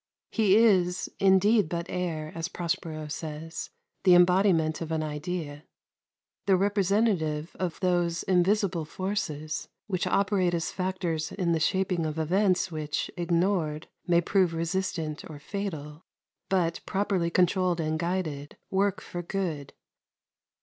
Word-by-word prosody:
He 210 -4 +4
is 185 -6 +3
indeed 195 0 +4
but 170 0 -2
air, 160 -4 -3
as 165 0 -3
Prospero 165 -3 -3
says 160 +1 -6 0.3
the 185 -2 +7
embodiment 175 -3 +4
of 165 -1 -4
an 160 -1 0
idea, 150 0 -4 0.8
the 195 - +5
representative 195 -5 +1
of 180 -3 -2
those 175 -2 +1
invisible 185 -1 +2
forces 155 -3 -3 0.2
which 185 -4 -1
operate 195 -3 +2
as 165 0 -2
factors 180 -4 -2
in 180 -4 -1
the 165 - +2
shaping 180 0 +1
of 155 0 -4
events 185 +3 +2
which, 155 -2 -3
ignored, 170 -2 0 0.2
may 170 -1 +4
prove 180 -1 +2
resistant 165 -2 -2
or 155 - -8
fatal, 155 -3 -5 0.5
but, 175 -3 +1
properly 190 -3 0
controlled 180 0 +2
and 155 0 -1
guided, 165 -5 -3
work 195 0 +1
for 175 - -6
good. 170 -6 -3
175 Hz, 125 wpm, -28 LUFS, 160-190 Hz, 0.8 s, the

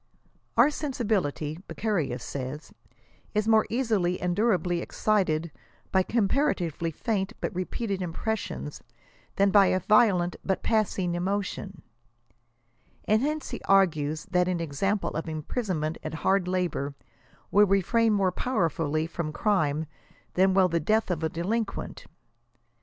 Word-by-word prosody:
" - - -40
Our 300 - +6
sensibility," 205 - -2
Beccaria 175 - -1
says, 135 +4 -6 0.3
" 120 - -33
is 210 +1 +1
more 220 -1 +4
easily 215 -8 0
and 180 -1 -1
durably 185 -5 +1
excited 170 -7 0 0.4
hy 190 - +5
comparatively 195 - 0
faint 195 +4 -2
but - - -3
repeated 190 +2 -3
impressions, 180 -3 -4 0.5
than 200 0 +3
by 200 -1 +6
a 185 - +2
violent, 185 -3 +3
but 190 - -1
passing 200 -5 +1
emotion 190 -1 -3 0.6
;" 120 +1 -38
and 215 +1 +3
hence 300 +1 -2
he - - -5
argues 155 -6 +2
that 180 -1 +3
an 180 -2 0
example 175 +6 -1
of 165 +1 -4
imprison 165 - -3
mnent 155 +1 -2
at 155 0 -5
hard 190 -2 +3
labor 175 -6 -1 0.6
will 205 +1 +6
restiain 215 +4 +3
more 195 -3 +2
powerfully 165 - 0
from 165 -1 -4
crime 155 -5 +1 0.5
than 190 +1 +3
will 190 -1 +5
the 170 -1 0
death 215 +5 +1
of 170 -3 -2
a 160 - +1
delinquent. 195 +6 -3
185 Hz, 135 wpm, -27 LUFS, 160-210 Hz, 0.6 s, Our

